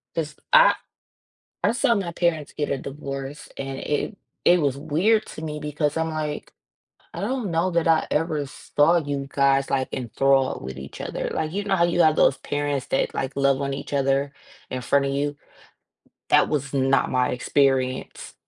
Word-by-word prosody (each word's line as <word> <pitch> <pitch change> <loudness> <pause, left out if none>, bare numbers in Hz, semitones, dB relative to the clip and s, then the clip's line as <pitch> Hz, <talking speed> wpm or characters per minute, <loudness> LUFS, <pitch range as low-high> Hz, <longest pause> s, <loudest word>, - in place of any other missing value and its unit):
'Cause 155 -2 -3 0.2
I - - +7 0.9
I 205 - +3
saw 240 0 +2
my 190 -5 -2
parents 165 -4 0
get 145 - -3
a 140 - 0
divorce 140 +1 -6
and 135 -1 -5
it 150 +9 -2 0.3
it 175 0 +5
was 140 -3 +1
weird 195 +10 +1
to 155 - -9
me 150 -1 -4
because 150 0 -1
I'm, 160 0 0
like, 155 -1 -4 0.6
"I - - -5
don't 250 -8 -2
know 170 +3 +1
that 170 -1 +1
I 160 -1 +4
ever 150 -2 0
saw 150 +5 +2
you 140 -3 -3
guys, 140 0 +2
like, 130 -1 0
enthralled 135 +2 +1
with 65 0 -7
each 65 +1 -9
other." - - -3
Like, 155 +2 -2
you 205 - -1
know 200 -1 +1
how 170 - +4
you 175 0 +2
have 155 -1 +5
those 135 - +4
parents 145 -2 -2
that, - - 0
like, 135 +1 -3
love 140 0 +2
on 140 0 -2
each 140 +1 -6
other 140 0 +1 0.4
in 130 - -4
front 140 +3 +2
of 135 - -1
you. 145 +1 -1 0.9
That - - +5
was 140 -2 -2
not 135 0 +2
my 125 -1 +2
experience, 130 0 0
145 Hz, 180 wpm, -24 LUFS, 135-165 Hz, 0.9 s, I